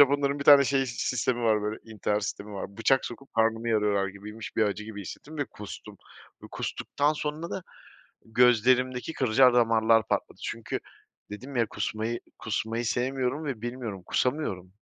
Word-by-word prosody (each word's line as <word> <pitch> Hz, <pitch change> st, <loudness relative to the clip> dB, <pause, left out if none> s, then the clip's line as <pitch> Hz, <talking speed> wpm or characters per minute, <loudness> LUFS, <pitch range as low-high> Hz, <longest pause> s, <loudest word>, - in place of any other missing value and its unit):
Japonların 140 Hz, 0 st, +4 dB
bir 140 Hz, -, -4 dB
tane 140 Hz, -1 st, +9 dB
şeyi, 135 Hz, -1 st, +1 dB
sistemi 120 Hz, 0 st, -1 dB
var, 110 Hz, -2 st, +3 dB
böyle, 105 Hz, +1 st, -3 dB
intihar 105 Hz, -1 st, -1 dB
sistemi 105 Hz, 0 st, -5 dB
var, 100 Hz, 0 st, -6 dB
bıçak 130 Hz, +4 st, +3 dB
sokup 135 Hz, +3 st, -10 dB
karnımı 115 Hz, 0 st, +2 dB
yarıyorlar 105 Hz, -3 st, +2 dB
gibiymiş 105 Hz, +3 st, -9 dB
bir 110 Hz, -, +4 dB
acı 105 Hz, +1 st, -2 dB
gibi 105 Hz, -1 st, -7 dB
hissettim 150 Hz, -, -9 dB
ve 145 Hz, -, +1 dB
kustum. 105 Hz, -4 st, -10 dB, 0.5 s
Bu -, -, -10 dB
kustuktan 145 Hz, +2 st, -1 dB
sonra 155 Hz, +2 st, -4 dB
da 190 Hz, -, -4 dB, 0.6 s
gözlerimdeki 125 Hz, +4 st, +3 dB
kılcal 125 Hz, -1 st, +4 dB
damarlar 115 Hz, -2 st, +4 dB
patladı. -, -, -2 dB
Çünkü -, -, -3 dB, 0.5 s
dedim 130 Hz, +6 st, -8 dB
ya 115 Hz, -, +3 dB
kusmayı 110 Hz, +2 st, -3 dB, 0.2 s
kusmayı 115 Hz, +2 st, -2 dB
sevmiyorum 130 Hz, +5 st, -1 dB
ve 130 Hz, -7 st, -4 dB
bilmiyorum, 120 Hz, -6 st, -5 dB
kusamıyorum. 100 Hz, -, -1 dB
115 Hz, 155 wpm, -28 LUFS, 105-130 Hz, 0.6 s, tane